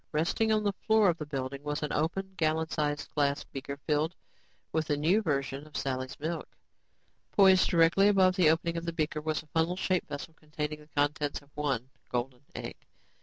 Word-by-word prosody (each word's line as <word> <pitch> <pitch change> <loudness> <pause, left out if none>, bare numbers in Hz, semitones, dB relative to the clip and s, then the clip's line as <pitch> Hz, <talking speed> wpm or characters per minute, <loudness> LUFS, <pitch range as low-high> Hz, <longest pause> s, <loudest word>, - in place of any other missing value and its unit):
Resting 170 +8 +1
on 215 -1 +2
the 205 -1 +1
floor 220 0 +3
of 170 - 0
the 150 - -5
building 135 -1 -4
was 150 +1 -3
an 150 - -2
open, 190 +5 -1
gallon 160 -1 +1
sized 145 -2 -2
glass 140 -1 +1
beaker 140 +1 -7
filled 150 +4 0 0.6
with 160 -1 0
the 145 - +1
new 170 +9 +3
version 140 -4 -2
of 150 - -7
Sally's 130 +1 -3
milk. 160 +3 -3 0.9
Poised 190 -2 +6
directly 170 +4 +5
above 190 -2 +5
the 180 -5 +5
opened 165 +1 0
beaker 155 -1 -1
was 155 0 -1
a - - -24
funnel 165 +2 +2
shaped 185 -2 0
vessel 145 +3 -6
containing 150 -1 -5
the 150 - -16
contents 145 0 0
of 140 - -24
one 135 -4 -2 0.2
golden 125 +1 -3
egg. - - -6
155 Hz, 180 wpm, -30 LUFS, 145-170 Hz, 0.9 s, Poised